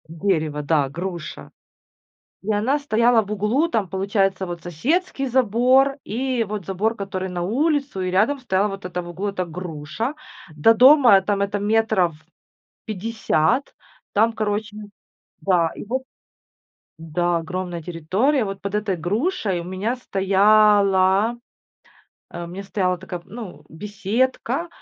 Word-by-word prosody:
Дерево, 160 -4 -1
да 145 -2 +1
груша. 170 - -6 0.9
И 215 - -1
она 230 +8 +1
стояла 235 -4 +3
в 205 -1 -8
углу, 210 - +1
там 215 - 0
получается 195 0 0
вот 175 -1 -6
соседский 270 - -1
забор, 255 +3 +3
и 250 +2 -1
вот 210 -3 -5
забор 205 +5 -1
который 190 -2 -4
на 180 -1 -4
улицу, 275 - 0
и 185 0 -2
рядом 220 +10 +2
стояла 205 -5 +1
вот 195 -2 -7
эта 180 0 -3
в 175 - -9
углу 190 +4 -3
эта 185 -2 -3
груша. 170 - -5 0.4
До 155 +10 +5
дома 250 -3 +7
там 200 +1 -1
это 200 +1 -1
метров 210 -5 +1 0.7
50, 220 - 0 0.4
там 220 +3 +3
короче 210 -1 -3 0.6
да, 175 -4 +2
и - - -8
вот 255 +5 -2 1.0
да, 170 +2 -1
огромная 175 +1 -5
территория. 190 - 0
Вот 195 -1 -5
под 200 0 -5
этой 210 -3 0
грушей 200 - -1
у - - -7
меня 190 +7 -2
стояла, 200 0 +3 0.9
а, 175 - -6
у - - -7
меня 180 +3 -7
стояла 190 -2 -1
такая, 175 +1 -7
м, - - -26
ну, 220 -4 -9
беседка. 225 - -2
200 Hz, 140 wpm, -22 LUFS, 180-230 Hz, 1.0 s, дома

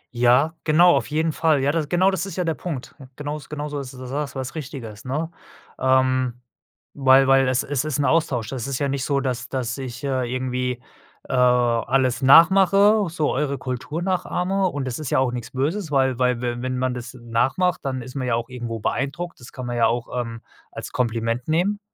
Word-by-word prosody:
Ja, 125 +7 +3
genau, 170 +3 +5
auf - - 0
jeden 160 +2 0
Fall. 155 -2 +2
Ja, 140 - +3
das 155 -2 -2
genau 185 +2 +3
das 190 0 -2
ist 195 - -7
ja 180 - 0
der 165 -2 0
Punkt. 150 -5 -6 0.2
Genaus 145 0 -6
genauso 150 -1 -4
ist 135 -1 -7
das, - - -11
da 130 - -7
sagst 140 +2 -4
du - - -3
was 130 0 -5
Richtiges, 130 -8 -8
ne? 155 +6 -2 0.5
Ähm, 130 -1 +2 0.5
weil 135 0 +5
weil 135 -1 +5
es 130 0 +1
es 145 -1 -1
ist 155 -2 -2
'n 145 - +1
Austausch. 130 -7 +1
Das 130 -2 -4
ist 135 -2 -2
ja 140 +1 -1
nicht 135 -1 -2
so, 140 -1 +1
dass 130 -2 -3
dass 125 -3 -2
ich, 130 0 -7
äh, 130 -3 -1
irgendwie, 125 -1 -2 0.5
äh, - - -5
alles 125 +1 +2
nachmache, 195 +8 +6
so 155 -3 -1
eure 140 0 -1
Kultur 130 +7 -4
nachahme 185 +1 0
und 145 -6 -3
das 125 +2 -4
ist 150 - -4
ja - - +2
auch 130 -2 +2
nix 120 -1 -5
Böses, 155 +8 -2
weil 130 -3 +2
weil 125 -1 +2
we 120 0 -2
wenn 130 0 -2
man 130 0 0
das 120 0 -7
nachmacht, 130 +9 0
dann 130 -2 -3
ist 130 +1 -10
man 130 -3 -3
ja 115 - +2
auch 115 +1 -3
irgendwo 120 -2 -5
beeindruckt, 140 +10 -3
das 120 - -12
kann 130 - -7
man 120 0 -3
ja 115 - +4
auch, 120 0 -1
ähm, 115 -1 -7 0.3
als - - -7
Kompliment 115 0 -1
nehmen. 180 +6 +1
130 Hz, 215 wpm, -23 LUFS, 125-155 Hz, 0.5 s, nachmache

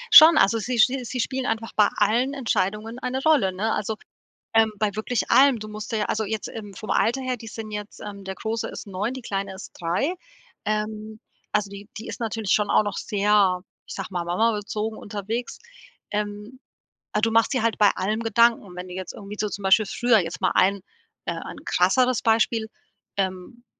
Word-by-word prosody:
Schon, 315 -3 +11
also 225 -2 +4
sie 245 +3 -2
sch 220 - +8 0.2
sie 250 +2 -4
spielen 260 +2 -1
einfach 225 0 -2
bei 210 - +6
allen 240 +7 +2
Entscheidungen 225 -2 -1
eine 260 +1 -3
Rolle, 290 -12 +4
ne, 205 +5 -1
also, 215 +1 -2 0.6
ähm, 225 -1 +5
bei 210 0 +1
wirklich 220 +3 -2
allem, 270 -2 +6
du 215 0 -7
musst 215 0 -7
dir 220 -2 0
ja - - +1
also 220 +1 -1
jetzt, 215 +1 -3
ähm, 205 -3 -8
vom 210 +2 -7
Alter 250 +4 +2
her, 255 -1 -2
die 225 - -10
sind 220 0 -7
jetzt, 210 0 -6
ähm 200 -1 -8
der 190 0 -5
Große 220 +3 -3
ist - - -8
9, 205 +5 -3
die 260 - -7
Kleine 195 -2 -3
ist 190 - -10
3. 180 - 0 0.5
Ähm, 215 0 -3 0.3
also, 205 -1 0
die 200 0 -10
die 220 - -7
ist - - -7
natürlich 220 -3 -1
schon 210 -1 +2
auch - - +4
noch 205 - -3
sehr, 200 -3 +2 0.2
ich - - -7
sage - - -5
mal, 175 -2 -2
Mama-bezogen 215 +3 -1
unterwegs. 215 +4 -4 0.5
Ähm, 210 +4 -4 0.5
äh, 210 - +1
du 225 +1 +2
machst 230 0 +3
dir 255 - +1
halt 230 -1 +1
bei 205 -1 +6
allem 210 +4 -1
Gedanken. 230 -3 +3
Wenn 180 +1 -6
du 180 - -8
jetzt 185 -1 -6
irgendwie 205 0 -9
so 210 - -1
zum 200 0 -6
Beispiel 195 +3 +5
früher 240 0 +3
jetzt 170 -2 -4
mal - - +2
ein 195 +2 +4 0.5
äh, - - -1
ein - - -8
krasseres 250 +7 +3
Beispiel, 225 0 +2 0.5
ähm, 190 +5 -3
215 Hz, 200 wpm, -24 LUFS, 200-230 Hz, 0.6 s, Schon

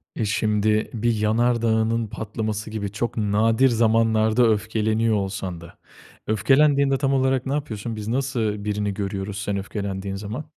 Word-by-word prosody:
E, 110 - -1
şimdi 105 +1 +1
bir 120 +1 +1
yanardağının 115 0 +1
patlaması 110 0 -4
gibi 100 -2 -4
çok 115 +3 -3
nadir 110 +5 +3
zamanlarda 115 0 +3
öfkeleniyor 110 +1 +1
olsan 95 -3 -3
da 85 - -13 0.5
öfkelendiğinde 135 +5 +3
tam 135 0 0
olarak 130 -1 +1
ne 135 - -2
yapıyorsun, 115 -6 -4
biz 105 0 -6
nasıl 115 -5 -1
birini 105 -1 -1
görüyoruz 100 0 -4
sen 100 -2 -2
öfkelendiğin 100 -1 -4
zaman? 110 +9 -6
110 Hz, 135 wpm, -23 LUFS, 105-115 Hz, 0.5 s, nadir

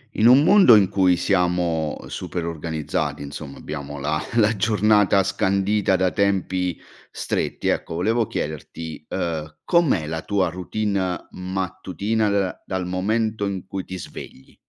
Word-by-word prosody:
In 110 - +4
un 130 +4 +7
mondo 185 - +7
in 100 -3 +4
cui 95 -3 +3
siamo 90 -4 0
super 85 -2 -5
organizzati, 80 -3 -3
insomma, 70 0 -8
abbiamo 75 -1 -6
la 75 +2 -1
la 110 -1 +4
giornata 105 -1 +3
scandita 100 +1 +1
da 95 -1 +1
tempi 95 -3 0 0.3
stretti, - - -2
ecco, 80 - -2
volevo 110 +6 +1
chiederti, 80 +1 -6
ehm, 80 -4 -3
com'è 160 - +2
la 80 +1 -4
tua 100 -1 0
routine 95 0 -2
mattutina, 95 +3 -2
da 100 -2 -1
dal 95 -1 -3
momento 105 +3 -1
in 95 -2 -4
cui 95 0 -5
ti 95 - -6
svegli? 65 -5 -10
95 Hz, 135 wpm, -23 LUFS, 80-105 Hz, 0.3 s, un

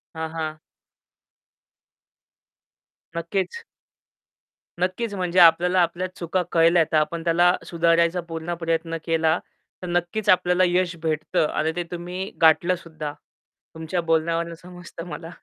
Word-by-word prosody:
हां, 160 0 -4
हां. 155 -1 -4 2.6
नक्कीच. 195 - -3 1.2
नक्कीच 185 +5 -1
म्हणजे 180 -2 0
आपल्याला 175 +2 +6
आपल्या 175 +2 -1
चुका 175 +2 -1
कळल्या 165 0 +5
तर 155 - +3
आपण 165 +2 0
त्याला 175 +1 +4
सुधारायचा 170 +1 +2
पूर्ण 165 +1 -4
प्रयत्न 165 0 -1
केला, 165 0 +2 0.4
तर 180 - -6
नक्कीच 175 +5 -1
आपल्याला 180 0 +4
यश 180 -1 +1
भेटतं 155 -1 0
आणि 155 +1 0
ते 175 - -1
तुम्ही 180 +2 -5
गाठलं 170 +3 +5
सुद्धा 155 -4 -7 0.6
तुमच्या 160 +2 -3
बोलण्यावरून 165 +1 +1
समजतं 175 -1 -10
मला. 165 -1 -7
170 Hz, 115 wpm, -23 LUFS, 165-180 Hz, 2.6 s, आपल्याला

